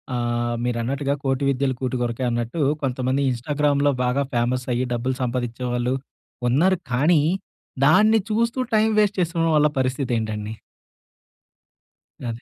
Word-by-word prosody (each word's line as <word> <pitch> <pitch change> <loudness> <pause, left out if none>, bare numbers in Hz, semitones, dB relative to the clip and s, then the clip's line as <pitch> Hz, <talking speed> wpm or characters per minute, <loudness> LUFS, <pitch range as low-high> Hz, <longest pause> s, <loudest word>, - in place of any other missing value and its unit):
ఆహ్, 120 0 -1
మీరన్నట్టుగా 125 +4 -1
కోటి 135 0 0
విద్యలు 135 0 0
కూటి 130 0 -2
కురకే 120 +1 -2
అన్నట్టు 120 +6 -2 0.2
కొంతమంది 130 +1 0
ఇన్‌స్టాగ్రామ్‌లో 145 +3 +1
బాగా 125 +3 +1
ఫేమస్ 125 +1 0
అయ్యి, 125 +2 0
డబ్బులు 125 +2 -1
సంపాదించేవాళ్ళు 125 0 -2 0.6
ఉన్నారు. 175 +9 +3
కానీ, 150 +5 +4 0.6
దాన్ని 215 +8 +5
చూస్తూ 230 +3 0 0.2
టైమ్ 220 0 +3
వేస్ట్ 205 -2 +2
చేసిన 165 -1 0
వాళ్ళ 150 0 +5
పరిస్థితి 130 0 -1
ఏంటండి? 110 -1 -4 1.8
అదే. 115 +1 -6
130 Hz, 120 wpm, -23 LUFS, 120-150 Hz, 1.8 s, దాన్ని